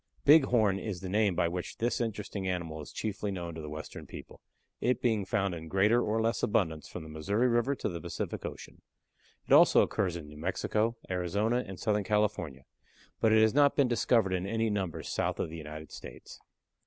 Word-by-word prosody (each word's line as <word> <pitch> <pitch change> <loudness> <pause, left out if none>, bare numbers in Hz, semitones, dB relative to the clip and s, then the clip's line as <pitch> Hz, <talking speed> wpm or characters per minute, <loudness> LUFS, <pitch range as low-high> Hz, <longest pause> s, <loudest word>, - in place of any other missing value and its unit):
Bighorn 125 -10 +5
is 95 -3 -5
the 95 - -5
name 100 -1 +2
by 85 - +2
which 90 +1 -5
this 120 +1 0
interesting 105 -3 -3
animal 85 -4 -3
is 75 - -10
chiefly 105 -1 -3
known 85 -3 -4
to 80 -2 -7
western 75 +1 -8
people, - - -11 0.4
it 125 -1 +1
being 110 -5 +1
found 100 -2 0
in 80 -1 -7
greater 105 +7 +3
or 110 0 0
less 115 +1 0
abundance 80 -7 0
from 90 - -7
the 80 - -10
Missouri 100 +11 0
River 120 +3 +2
to - - -3
the 85 -4 -5
Pacific 85 -1 -4
Ocean. - - -8 0.6
It - - +2
also - - +7
occurs 95 -4 -1
in 80 -3 -7
New 75 0 -12
Mexico, 105 +6 -1
Arizona, 100 +7 0
and 95 -2 -8
Southern 105 -2 +1
California, 100 -10 -1 0.6
but 110 - +3
it 110 0 +6
has 110 - +3
not 145 0 +4
been 140 -3 +4
discovered 115 -4 +2
in 90 +1 -1
any 115 +1 0
numbers 95 -5 -3
south - - -1
of - - -2
the 85 - -6
United 75 0 -8
States. - - -10
100 Hz, 195 wpm, -30 LUFS, 85-110 Hz, 0.6 s, also